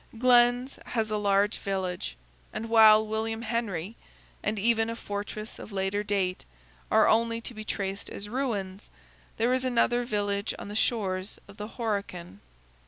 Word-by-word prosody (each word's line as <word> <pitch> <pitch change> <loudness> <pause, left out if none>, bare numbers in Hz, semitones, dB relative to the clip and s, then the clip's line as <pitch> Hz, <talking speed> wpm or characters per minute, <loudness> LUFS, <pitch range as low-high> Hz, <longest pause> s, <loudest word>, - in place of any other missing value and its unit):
Glen's 245 +1 +4
has 220 -2 -1
a 215 - +1
large 205 +1 +2
village; 185 - -3 0.3
and 225 - -5
while 220 -1 +7
William 220 +1 -2
Henry, 220 -4 -2 0.5
and 215 +1 -1
even 225 +2 +2
a 230 - -3
fortress 210 0 -5
of - - -9
later 195 +1 -1
date, 195 -3 -1 0.5
are - - +5
only 230 +1 +2
to 240 - -4
be 215 -1 -7
traced 195 -1 -3
as 200 - -7
ruins, 210 -6 -3 0.5
there 235 +3 +2
is 255 0 +1
another 245 -1 +2
village 205 -3 -1
on - - -8
the 205 - -6
shores 195 -4 0
of 200 0 -14
the 210 - -5
Horican. 200 - -3
215 Hz, 155 wpm, -28 LUFS, 200-230 Hz, 0.5 s, while